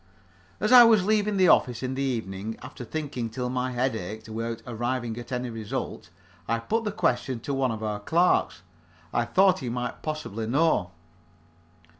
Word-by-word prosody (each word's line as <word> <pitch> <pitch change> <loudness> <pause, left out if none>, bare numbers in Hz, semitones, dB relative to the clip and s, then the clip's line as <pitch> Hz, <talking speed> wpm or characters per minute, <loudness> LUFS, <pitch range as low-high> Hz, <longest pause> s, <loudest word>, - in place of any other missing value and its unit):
As 215 - 0
I 250 -1 +11
was 220 -5 +5
leaving 210 -1 +2
the 185 -2 +5
office, 125 0 +3
in 130 0 -2
the 135 - -3
evening, 110 -5 -3
after 130 0 -8
thinking 130 -3 -4
till 125 +2 -3
my 130 0 -1
head 125 0 0
ached 110 +2 -6
without 115 +1 -4
arriving 120 0 -2
at 120 +1 -10
any 125 -1 -2
result, 110 -6 -5 0.4
I 115 - +1
put 220 - -1
the 210 - -1
question 125 - 0
to 140 - -3
one 135 -1 +1
of 110 -1 -5
our 105 -1 -2
clerks. 165 - +1 0.5
I 120 - +1
thought 185 +9 +4
he 125 - -4
might 125 +1 -4
possibly 135 -9 -4
know. 140 - +2
125 Hz, 175 wpm, -26 LUFS, 115-155 Hz, 0.5 s, I